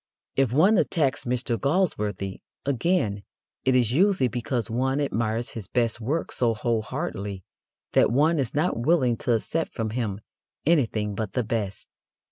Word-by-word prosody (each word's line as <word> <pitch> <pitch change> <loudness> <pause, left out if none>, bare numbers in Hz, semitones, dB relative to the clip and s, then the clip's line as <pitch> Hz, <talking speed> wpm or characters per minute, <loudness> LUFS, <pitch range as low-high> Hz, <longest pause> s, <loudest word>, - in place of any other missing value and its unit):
If 135 -4 +2
one 185 - +5
attacks 145 -5 +1
Mr. 120 -1 -1
Galsworthy, 105 - 0 0.2
again, 135 - +1 0.4
it 130 -1 +3
is 120 -3 +3
usually 185 -2 +3
because 120 0 -2
one 130 +4 0
admires 115 -4 -1
his 110 -5 -7
best 120 0 0
work 145 +9 -1
so 115 -2 +1
whole 115 0 0
heartedly 105 - -4 0.5
that - - +4
one 150 +6 +3
is 130 -2 -2
not 150 -4 +1
willing 130 -2 +3
to 125 0 0
accept 160 +8 -1
from 110 -2 -2
him 110 -4 -2 0.5
anything 115 -10 +2
but 105 0 -4
the 125 - +1
best. 105 -3 -3
120 Hz, 150 wpm, -26 LUFS, 110-145 Hz, 0.5 s, one